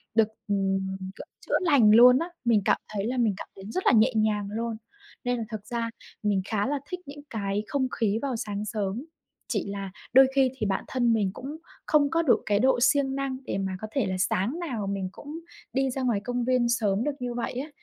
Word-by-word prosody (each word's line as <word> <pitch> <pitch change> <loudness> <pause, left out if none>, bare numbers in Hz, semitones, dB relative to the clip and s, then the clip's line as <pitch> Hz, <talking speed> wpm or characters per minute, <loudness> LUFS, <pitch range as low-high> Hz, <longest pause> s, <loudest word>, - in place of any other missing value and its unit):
được, 225 -1 +5 0.2
ừm, 195 -1 0 0.2
kiểu, - - -9 0.2
chữa - - +3
lành 280 -12 +5
luôn 250 +2 +8
á. 335 - -3 0.2
Mình 225 -3 +4
cảm - - +4 0.2
thấy 200 -1 -1
là 255 +2 -2
mình 230 -4 +3
cảm - - -7
thấy 195 - -11
rất 370 - -2
là - - +6
nhẹ 235 +2 +5
nhàng 215 -2 +1
luôn. 230 +1 -2 0.5
Nên 245 0 0
là 230 - -2
thật 215 -3 -6
ra 230 +1 -2 0.3
mình 205 -2 +2
khá 210 -2 0
là 285 +1 -1
thích 360 - -4
những 285 +1 -9
cái 205 -1 -2
không 270 0 0
khí 220 -1 +2
vào 275 -3 -1
sáng 210 -2 -3
sớm, 210 +4 -3 0.5
chỉ - - -1
là 200 -1 -5 0.2
đôi 265 +1 +8
khi 270 -1 +4
thì 215 - -1
bản 195 -2 0
thân 240 -3 +2
mình 205 -4 +1
cũng 280 +7 -7 0.3
không 295 -2 +4
có 330 +2 +2
được 295 -7 +3
cái 205 -1 +2
độ 260 +2 +3
siêng 270 +1 +3
năng 275 -1 -2
để - - -2
mà 190 -1 -2
có 215 - -4
thể 270 -3 +1
là 185 -1 -2
sáng 195 - 0
nào 245 - -3
mình 195 -1 -2
cũng 295 +8 -8 0.3
đi 270 0 +1
ra 265 - -3
ngoài 240 -5 +1
công 245 0 -1
viên 250 -1 +2
sớm 215 -3 +1
được 295 - 0
như 245 -1 -3
vậy 240 - -3
á. 265 +5 -4
235 Hz, 230 wpm, -27 LUFS, 205-265 Hz, 0.5 s, luôn